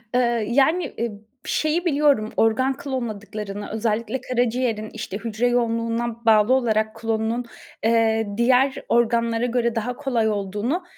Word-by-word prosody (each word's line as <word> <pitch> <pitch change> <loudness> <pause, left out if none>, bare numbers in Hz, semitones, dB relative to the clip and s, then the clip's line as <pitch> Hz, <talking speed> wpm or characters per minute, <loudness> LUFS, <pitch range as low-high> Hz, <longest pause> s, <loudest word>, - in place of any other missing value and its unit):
Eee, 235 -3 +2
yani, 285 +8 +2
ııı, 235 -1 -1 0.3
şeyi 315 +3 0
biliyorum 285 -8 +2
organ 260 +5 +2
klonladıklarını, 210 -5 -5
özellikle 225 +3 -1
karaciğerin, 240 -3 -1
işte, 215 -3 -5
hücre 230 +2 -1
yoğunluğuna 235 -1 -1
bağlı 220 +2 +5
olarak 220 -4 +1
klonunun, 225 +1 -1 0.4
eee, 225 -1 +2
diğer 255 +3 +3
organlara 235 0 +2
göre 235 -1 0
daha 235 +2 -2
kolay 245 -5 0
olduğunu 210 - -2
230 Hz, 120 wpm, -23 LUFS, 220-250 Hz, 0.4 s, bağlı